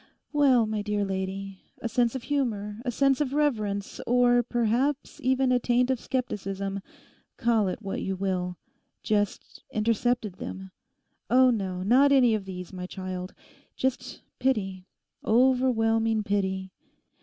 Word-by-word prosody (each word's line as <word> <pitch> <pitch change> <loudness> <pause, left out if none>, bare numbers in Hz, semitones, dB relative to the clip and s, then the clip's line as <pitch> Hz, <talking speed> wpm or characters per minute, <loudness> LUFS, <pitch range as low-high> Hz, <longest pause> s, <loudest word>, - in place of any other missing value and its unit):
Well, 270 -6 +4
my 215 -1 -2
dear 205 -1 -1
lady, 190 0 -4 0.2
a - - -3
sense 240 +1 +1
of 260 - -4
humour, 220 -7 -2
a 255 - -2
sense 275 +3 +2
of 275 -2 -1
reverence, 215 -9 -1
or 245 0 +4
perhaps 245 +6 -1
even 260 0 +2
a 250 - +4
taint 245 +1 +2
of 260 - 0
scepticism—call 200 -1 -3
it 185 +4 -4
what 195 - -3
you 190 - -2
will—just 190 +2 -3
intercepted 225 -2 0
them. 190 0 -7 0.6
Oh 255 +1 +6
no, 190 -5 -2
not 260 +7 +5
any 255 -4 +5
of 210 -3 -2
these, 180 -1 -7
my 180 -1 -5
child; 185 -1 -6 0.4
just 260 -1 -3 0.2
pity, 195 -8 -1 0.4
overwhelming 225 -3 +3
pity. 190 -2 -1
220 Hz, 130 wpm, -27 LUFS, 195-250 Hz, 0.6 s, Oh